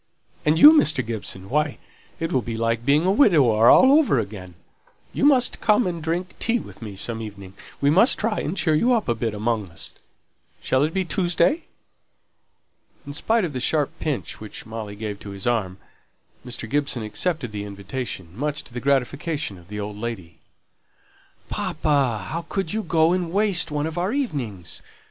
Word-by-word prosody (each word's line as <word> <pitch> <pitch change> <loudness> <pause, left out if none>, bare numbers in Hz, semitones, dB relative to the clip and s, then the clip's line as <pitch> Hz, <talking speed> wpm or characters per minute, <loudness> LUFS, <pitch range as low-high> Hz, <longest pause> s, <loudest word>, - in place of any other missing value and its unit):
"And 155 +1 +4
you, 300 - +10
Mr. 155 - +3
Gibson; 105 -4 -4
why, 150 +3 0 0.4
it'll 165 -6 0
be 115 0 -5
like 115 0 0
being 145 +6 +3
a 190 - +3
widower 140 - +5
over 270 - +6
again! 100 -5 -5 0.6
You - - +1
must 265 -4 +3
come 210 +2 +3
and 170 -2 -3
drink 170 +3 -2
tea 235 +1 +1
with - - -10
me 105 -3 -7
some 115 +3 -3
evening. 100 -3 -9 0.3
We 140 0 +3
must 195 - +5
try 215 0 -1
and 175 +6 -3
cheer 160 -2 +2
you 235 +12 +3
up 225 -3 0
a 120 - +2
bit 115 -1 -3
amongst 105 -3 -2
us. 85 - -7 0.7
Shall 130 +1 +1
it 160 - -4
be 190 -1 +1
Tuesday?" 180 - +1 1.4
In 145 - -7
spite 220 +7 +1
of 155 - -5
the 130 - -3
sharp 145 +3 +1
pinch 150 -5 -3
which 110 - -8
Molly 110 -2 -6
gave 105 -1 -5
to 100 - -9
his 100 -1 -7
arm, 105 -6 0 0.7
Mr. 120 -2 -7
Gibson 140 -2 -1
accepted 125 +3 -2
the 105 -1 -5
invitation, 100 -3 -6
much 150 +5 -2
to - - -16
the 120 - -5
gratification 140 - -1
of 85 - -18
the 105 +1 -6
old 105 0 -5
lady. 105 -7 -6 1.1
"Papa, 130 -9 0
how 165 +1 -4
could 195 -3 -2
you 220 - 0
go 160 -2 +2
and 180 -2 -1
waste 195 -3 +2
one 150 0 -1
of 160 +2 -3
our 185 +4 0
evenings! 125 - -3
140 Hz, 175 wpm, -23 LUFS, 110-175 Hz, 1.4 s, you